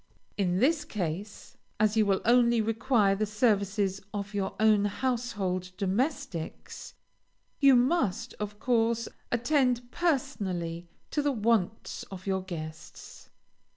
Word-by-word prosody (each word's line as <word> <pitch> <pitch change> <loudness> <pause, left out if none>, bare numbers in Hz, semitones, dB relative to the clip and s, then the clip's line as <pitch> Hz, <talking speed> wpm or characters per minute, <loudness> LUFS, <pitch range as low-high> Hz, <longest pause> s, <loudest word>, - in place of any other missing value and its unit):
In 180 -3 0
this 295 - +3
case, 200 - -5 0.2
as 215 0 +3
you 215 -2 +3
will 195 -1 +2
only 235 0 +4
require 225 -1 +2
the 210 +2 -1
services 200 -3 +1
of 205 0 -5
your 200 -1 -2
own 215 -2 +4
household 205 -5 -2
domestics, 205 - -3 0.6
you 275 -2 +7
must, 245 - +1
of 210 0 -5
course, 230 -1 +1 0.2
attend 245 -1 +1
personally 190 - -2 0.2
to 295 - +1
the 290 0 +1
wants 220 -3 0
of 185 -1 -9
your 190 -1 0
guests. 160 -4 -9
215 Hz, 120 wpm, -29 LUFS, 195-245 Hz, 0.6 s, you